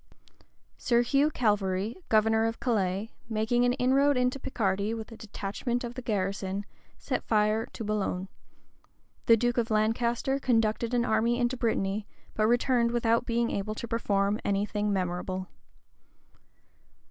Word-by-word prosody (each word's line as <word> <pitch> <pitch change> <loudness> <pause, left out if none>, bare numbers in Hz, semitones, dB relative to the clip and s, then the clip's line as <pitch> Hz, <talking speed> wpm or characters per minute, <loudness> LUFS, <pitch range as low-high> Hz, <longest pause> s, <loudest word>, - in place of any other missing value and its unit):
Sir 240 0 +3
Hugh 280 +4 +3
Calverly, 205 -5 0
governor 220 0 +3
of 225 - -4
Calais, 205 -3 -1 0.2
making 225 +2 +1
an 245 - +3
inroad 270 +3 +3
into 250 +2 +1
Picardy 205 -3 -1
with 225 0 -7
a - - -8
detachment 220 +3 -4
of 240 0 -5
the 255 - -6
garrison, 195 -2 -2 0.3
set - - -3
fire 215 +1 +1
to - - -8
Boulogne.[] 200 -3 -2 1.0
The 230 - +7
duke 240 +2 +1
of 230 0 -1
Lancaster 235 +5 +1
conducted 230 -1 +1
an 240 -1 +2
army 235 +1 +2
into 240 +1 +1
Brittany, 210 -4 -1 0.3
but 215 0 +2
returned 240 0 +2
without 235 0 +1
being 235 0 +1
able 215 +2 -3
to 235 - -6
perform 205 -2 0
any 200 0 +1
thing 210 0 -1
memorable. 185 0 -2
225 Hz, 140 wpm, -28 LUFS, 205-240 Hz, 1.0 s, The